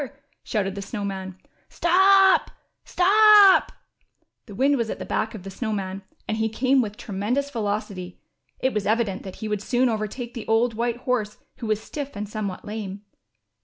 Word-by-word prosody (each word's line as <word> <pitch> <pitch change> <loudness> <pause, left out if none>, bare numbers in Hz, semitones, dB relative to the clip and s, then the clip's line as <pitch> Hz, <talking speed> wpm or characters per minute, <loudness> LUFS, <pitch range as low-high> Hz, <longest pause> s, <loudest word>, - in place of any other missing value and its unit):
shouted 195 -4 -2
the 200 - -6
Snow 205 +1 -5
Man. 190 -1 -5 0.3
Stop, 385 +2 +4 0.3
stop! 410 +1 +6 0.4
" - - -48
The 205 - -10
wind 275 +6 +3
was 230 -4 -1
at - - -4
the - - -7
back 220 +1 -2
of 195 - -9
the 195 - -8
Snow 220 +3 -4
Man, 195 -2 -4 0.3
and 220 - -1
he 220 0 0
came 260 +4 +2
with 210 -2 -5
tremendous 235 +8 -2
velocity. 205 -5 -4 0.4
It 260 - 0
was 210 -2 -2
evident 215 -3 0
that 190 - -9
he 220 - -6
would 210 -2 -2
soon 250 +3 +1
overtake 225 +2 -4
the 230 - -7
old 230 +1 +2
white 235 +1 -1
horse 220 -5 -1 0.2
who 240 -3 -6
was 215 -1 +1
stiff 285 0 -6
and 205 +1 -4
somewhat 205 -3 -5
lame. 205 -2 -6
220 Hz, 180 wpm, -24 LUFS, 205-255 Hz, 0.4 s, stop